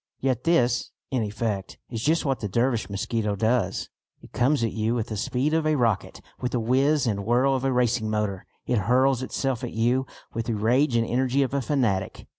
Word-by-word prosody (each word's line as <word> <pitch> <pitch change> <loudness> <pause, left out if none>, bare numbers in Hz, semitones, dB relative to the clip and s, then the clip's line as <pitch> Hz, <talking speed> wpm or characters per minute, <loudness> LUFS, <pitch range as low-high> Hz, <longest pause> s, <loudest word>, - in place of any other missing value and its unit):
Yet 130 -2 -1
this, 125 -8 +2 0.2
in 130 -3 +1
effect, 105 -2 -3
is 115 -2 -3
just 160 +6 +1
what 135 -2 0
the 105 - -3
Dervish 115 -1 0
mosquito 105 +1 -1
does. 110 -2 0 0.4
It - - -14
comes 130 +1 +2
at 115 - 0
you 110 +2 0
with 115 -1 -2
the 110 - -3
speed 130 +8 -1
of 160 -1 +2
a 155 - +3
rocket, 115 -8 0 0.2
with 125 - -3
the 125 - +1
whizz 135 +6 +2
and 100 -4 -1
whirr 120 +5 +2
of 135 -1 +1
a 135 - +1
racing 120 -3 +1
motor. 105 -3 -2 0.2
It 120 - +1
hurls 130 0 +3
itself 130 -1 -2
at - - -4
you 125 +4 +1 0.3
with 115 -1 -3
the 115 - 0
rage 120 +5 +2
and 115 0 +3
energy 130 +2 +1
of 135 - -3
a 140 - +1
fanatic. 115 -10 -1
120 Hz, 210 wpm, -25 LUFS, 110-130 Hz, 0.4 s, a